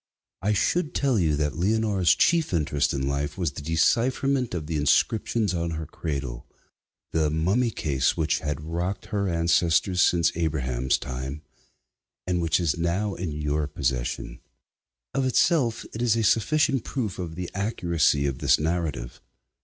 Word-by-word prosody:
I 105 +2 +1
should 155 - 0
tell 135 -6 +2
you 80 -4 +2
that 75 +2 -2
Leonora's 100 -3 +2
chief 165 - +2
interest 75 -3 +1
in 70 -1 -2
life 70 +1 -2
was 85 -6 -1
the 70 - -8
decipherment 120 - +1
of 80 -3 -4
the 80 +1 -3
inscriptions 100 +7 +1
on 85 -2 -2
her 80 - -4
cradle 70 -6 -5 0.6
the 80 -2 +1
mummy 95 +11 +1
case 70 - 0
which 80 0 +1
had 75 -1 -3
rocked 85 +5 -3
her 100 -2 0
ancestors 85 +1 +2
since 85 -2 +3
Abraham's 65 -6 0
time, 65 +3 -6 0.8
and 90 -1 0
which 80 0 +2
is 85 -1 0
now 95 +5 0
in 90 -3 -4
your 75 0 -1
possession. 65 -4 -3 0.7
Of 135 0 0
itself 130 -2 +2
it 115 - -5
is 120 -2 +3
a 115 - 0
sufficient 135 +5 +2
proof 115 -9 -3
of 85 -3 -5
the 90 0 -5
accuracy 85 -8 +1
of 70 -3 -2
this - - +4
narrative. 80 -6 -3
85 Hz, 155 wpm, -25 LUFS, 75-105 Hz, 0.8 s, this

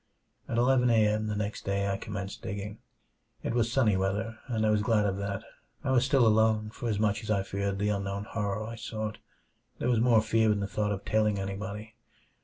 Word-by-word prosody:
At 115 - -1
eleven 125 0 +4
a. 110 -2 +5
m. 110 +1 0
the 105 - -2
next 105 0 -3
day 100 0 0
I 100 - 0
commenced 100 0 -6
digging. 100 +2 -5 0.6
It - - -1
was 115 -1 +1
sunny 115 -6 +3
weather, 105 +4 -1
and 110 -3 0
I 110 - +3
was 105 -1 +3
glad 105 -2 +2
of 100 -1 0
that. 100 -1 -3 0.4
I - - 0
was 125 -2 +4
still 130 -2 +4
alone, 110 -1 +3
for 120 0 -4
as 105 - 0
much 105 +1 +1
as 110 - -8
I 100 -3 +2
feared 100 0 -2
the 105 +1 0
unknown 100 0 -2
horror 105 -1 -2
I 115 +1 -7
sought, 110 -1 -4 0.6
there 125 - -1
was 115 - +3
more 115 -2 +5
fear 110 0 +3
in 105 - +1
the 100 - -1
thought 105 +1 -1
of 100 0 -4
telling 105 -1 +2
anybody. 105 +2 -5
105 Hz, 215 wpm, -29 LUFS, 100-110 Hz, 0.6 s, a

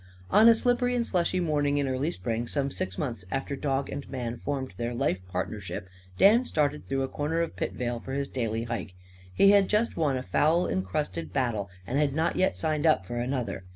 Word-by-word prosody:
On 220 +2 +8
a 230 - +7
slippery 245 +1 +1
and 235 -1 +1
slushy 180 -1 0
morning 145 -4 +1
in 140 -1 +1
early 130 +4 0
spring, 120 -8 -3
some 140 0 -1
six 95 -6 -3
months 115 -10 -3
after 135 +3 -2
dog 135 0 -1
and 140 -2 -6
man 120 -3 -4
formed 135 -2 -3
their 120 0 -2
lifepartnership, 95 -4 -3 0.3
Dan 225 +5 +6
started 150 - -1
through 135 0 0
a - - -1
corner 150 +5 -1
of 170 - -3
Pitvale 120 -1 -3
for 130 - -7
his 140 0 -1
daily 115 -4 -2
hike. 115 -6 -5 0.4
He 195 - +6
had 200 -1 +5
just 215 +2 +1
won 145 -5 +1
a 130 - -4
foul 165 +7 +2
incrusted 95 - -2
battle 110 -7 -1 0.2
and 135 +7 -1
had 145 -2 +2
not 160 +2 +1
yet 185 - +1
signed 155 0 0
up 155 -12 +3
for 120 +5 -5
another. 120 -6 -2
135 Hz, 200 wpm, -28 LUFS, 115-160 Hz, 0.4 s, On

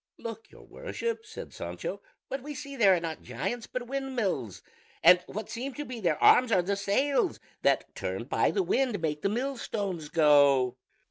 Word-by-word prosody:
"Look, 225 -1 -8
your - - -16
Worship," 465 -3 -5
said 445 - -9
Sancho; - - -5 0.3
"what 270 - -4
we 295 +2 -7
see 280 0 -7
there 200 -7 +5
are - - 0
not 165 -2 -5
giants 145 - -4
but 255 -1 -4
windmills, 240 - -3 0.4
and 180 0 +8
what 215 0 -5
seem 250 +3 -5
to 295 - -5
be 250 -3 -6
their 170 -7 +1
arms 250 -1 +6
are 185 -4 +4
the 200 +3 0
sails 265 - +1 0.2
that - - +1
turned - - -4
by - - +2
the 390 - +1
wind 255 - +1
make 150 -2 -2
the - - +1
millstones 210 - -3
go." 140 -5 +5
220 Hz, 180 wpm, -29 LUFS, 170-270 Hz, 0.4 s, and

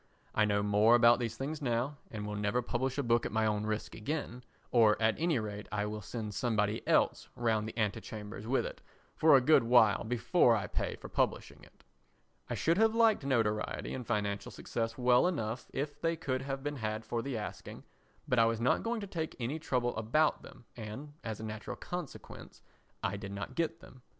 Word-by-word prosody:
I 110 - +3
know 100 -1 +1
more 105 +3 +5
about 120 0 +6
these 115 -2 -3
things 150 +3 -4
now, 125 +2 -1
and 105 -2 -5
will 105 - -4
never 105 +4 0
publish 130 +3 -2
a 140 - 0
book 120 -1 +2
at - - -3
my 110 0 +1
own 105 0 0
risk 105 0 -3
again, 125 -1 -4 0.3
or 110 -3 +5
at 110 0 +3
any 165 -2 +2
rate 105 -2 -5
I 105 0 -1
will 105 0 -4
send 105 +1 -5
somebody 105 0 0
else - - +2
round 110 -2 0
the 110 - -11
antechambers 110 0 -4
with 135 +2 +1
it - - -7 0.3
for 155 -2 +6
a - - +3
good 155 +5 +6
while 115 -3 +5
before 115 -2 +3
I - - -1
pay - - -2
for - - -10
publishing - - -1
it. - - -20 0.7
I - - -1
should 165 +4 +2
have 225 0 +4
liked 225 -7 +4
notoriety 110 -5 0
and 130 - -4
financial 100 -2 -1
success 115 -1 -3
well 125 +4 +4
enough 120 -9 -3
if 145 +2 -4
they 165 0 +1
could 130 -5 -2
have 135 0 -4
been 145 0 -3
had 110 -1 -3
for 115 - -2
the 135 -1 -3
asking, 105 - -7 0.4
but 125 - +2
I 115 - +6
was 115 0 0
not 120 +2 +2
going 230 -1 -2
to 200 - -5
take 160 -4 -4
any 130 +7 -2
trouble 125 -6 -1
about 120 +8 +2
them 125 -2 -14
and, 120 +6 -7
as 110 -2 -4
a - - -7
natural 110 0 -5
consequence, 175 -5 -8 0.4
I 100 +1 -1
did 100 0 -7
not 105 +6 -5
get 165 +2 -2
them. 130 - -15
115 Hz, 205 wpm, -32 LUFS, 110-135 Hz, 0.7 s, about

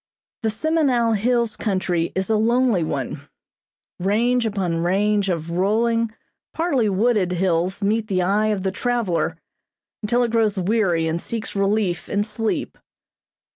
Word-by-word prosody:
The 225 - 0
Semenow 245 -2 +1
Hills 235 +1 +1
country 185 -5 -1
is 190 +3 -1
a - - +3
lonely 230 -3 +2
one. 140 -1 -4 0.7
Range 230 +6 +1
upon 190 -5 -1
range 200 +3 +1
of 170 -2 -2
rolling, 225 +5 +1 0.4
partly 280 -10 +1
wooded, 200 -2 +1
hills 180 +2 0
meet 215 +2 +1
the 185 -3 0
eye 205 +4 +2
of 205 -3 -1
the 190 - 0
traveler 230 -5 -1 0.6
until 235 +3 +1
it 235 - -1
grows 220 -3 +1
weary 185 -4 +1
and 165 +1 -2
seeks 225 -2 -5
relief 195 -3 0
in 205 0 +1
sleep. 225 +1 -3
210 Hz, 135 wpm, -22 LUFS, 185-230 Hz, 0.7 s, a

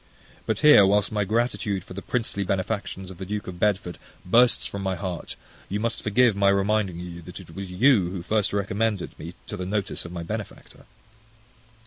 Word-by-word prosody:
But 110 -1 0
here, 150 -9 +8
whilst 100 +2 +3
my 105 -1 +1
gratitude 110 -3 0
for - - -11
the 100 - -6
princely 110 -4 -2
benefactions 95 0 -3
of 90 - -12
the - - -4
Duke 105 +1 -3
of 90 -1 -8
Bedford 95 -3 0 0.3
bursts 120 +6 +4
from 100 - -5
my 95 -1 -1
heart, 90 -1 -5 0.3
you 100 - -1
must 115 +1 -2
forgive 115 +1 +3
my 100 0 +4
reminding 100 -2 +1
you 85 -1 -7
that 90 +3 -9
it 85 -3 -13
was 95 -1 -6
you 100 -1 +4
who 90 -2 -5
first 105 +1 +1
recommended 100 0 -1
me 85 +3 -8
to - - -6
the 90 - -4
notice 100 0 -2
of 85 - -8
my 85 -1 -5
benefactor. 105 +3 -7
100 Hz, 190 wpm, -25 LUFS, 90-105 Hz, 0.3 s, here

